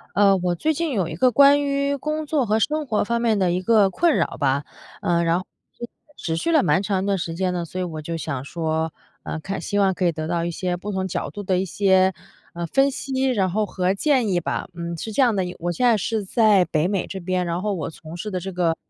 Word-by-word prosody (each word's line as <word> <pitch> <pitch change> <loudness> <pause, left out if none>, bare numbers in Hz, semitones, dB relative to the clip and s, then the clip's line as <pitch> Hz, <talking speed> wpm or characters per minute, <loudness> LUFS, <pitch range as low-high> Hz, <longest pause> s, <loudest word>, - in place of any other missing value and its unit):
呃 200 -1 +5
我 180 -1 0
最 315 - 0
近 325 0 -2
有 195 -8 0
一 155 - -6
个 255 +7 +4
关 280 +4 +6
于 280 0 0
工 305 +3 -3
作 290 -4 +1
和 215 +1 +2
生 300 +6 0
活 215 -5 +1
方 235 +2 -1
面 225 -3 +2
的 185 -3 +2
一 180 - 0
个 210 -2 +4
困 340 - +2
扰 - - -1
吧。 140 -1 +1 0.4
呃 170 0 +2
然 165 +1 +2
后 185 - -7 0.7
持 160 - -3
续 250 - -1
了 315 -4 +4
蛮 190 - +2
长 195 -2 -1
一 - - -3
段 200 -1 +1
时 170 -2 -4
间 185 0 0
的， 175 -1 -2
所 185 +3 -6
以 - - 0
我 160 -3 -6
就 165 +2 -4
想 140 -5 -4
说， 160 +1 -2 0.3
呃 - - -4
看 195 +4 -4
希 205 - -2
望 195 -2 +3
可 185 - -2
以 175 - +4
得 155 0 -4
到 170 0 -1
一 170 - -2
些 180 +1 -2
不 195 +4 -6
同 190 -1 -2
角 185 - -3
度 205 - -7
的 185 -1 +1
一 185 - 0
些， 190 0 +3 0.4
呃 170 0 -3
分 270 - +3
析， 265 -1 -3
然 200 -6 +1
后 215 +4 0
和 185 -1 0
建 255 +1 +2
议 180 -3 +1
吧。 - - -3
嗯， 170 0 -5
是 220 +7 -6
这 240 - +2
样 235 -5 +3
的， 190 - +1 0.2
我 175 +1 -1
现 250 +8 +1
在 235 -2 +5
是 215 0 -2
在 210 -2 +4
北 160 +1 0
美 195 -3 -1
这 190 - -6
边， 180 0 -1
然 170 +1 -2
后 210 0 0
我 160 -6 -3
从 160 +1 -10
事 210 +4 -5
的 185 - -2
这 190 - -5
个， 170 -2 +1
190 Hz, 285 characters per minute, -23 LUFS, 170-225 Hz, 0.7 s, 关